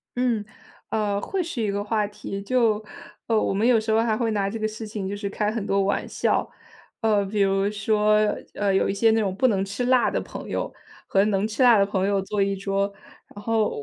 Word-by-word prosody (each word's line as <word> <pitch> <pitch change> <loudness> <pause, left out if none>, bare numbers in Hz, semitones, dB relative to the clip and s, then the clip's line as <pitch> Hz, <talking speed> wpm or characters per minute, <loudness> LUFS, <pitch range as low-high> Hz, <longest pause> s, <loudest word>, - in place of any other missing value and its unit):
嗯， 245 -4 +1 0.5
呃， 205 -2 0
会 385 - -2
是 315 -8 -4
一 210 - 0
个 200 +1 -2
话 210 0 0
题， 200 -1 -7
就， 220 -1 +1 0.4
呃， 225 -2 +3
我 - - 0
们 205 +3 +1
有 240 -2 +5
时 220 0 -2
候 220 +1 +4
还 225 -2 +1
会 230 -1 0
拿 200 -2 0
这 225 - -4
个 215 - 0
事 220 0 -7
情 205 -3 -4
就 200 - -3
是 205 0 -4
开 210 +1 -1
很 220 -2 -3
多 195 -1 +1
玩 200 - -1
笑。 - - 0 0.5
呃， 215 -3 +3
比 205 +2 -3
如 195 0 +2
说， 210 0 +2 0.4
呃， 200 -2 +1
有 - - +2
一 - - 0
些 220 +3 +3
那 225 - +2
种 195 -3 -1
不 255 +5 +3
能 195 -4 +1
吃 200 +5 -3
辣 255 -1 +4
的 - - 0
朋 - - -8
友， - - -3 0.3
和 195 0 +3
能 210 0 +1
吃 225 +4 0
辣 240 -3 +7
的 200 - +4
朋 195 -2 -1
友 200 -1 +1
坐 200 +1 -2
一 195 0 +1
桌， 195 +1 -1 0.4
然 205 - -10
后 220 0 +1
210 Hz, 250 characters per minute, -24 LUFS, 200-225 Hz, 0.5 s, 辣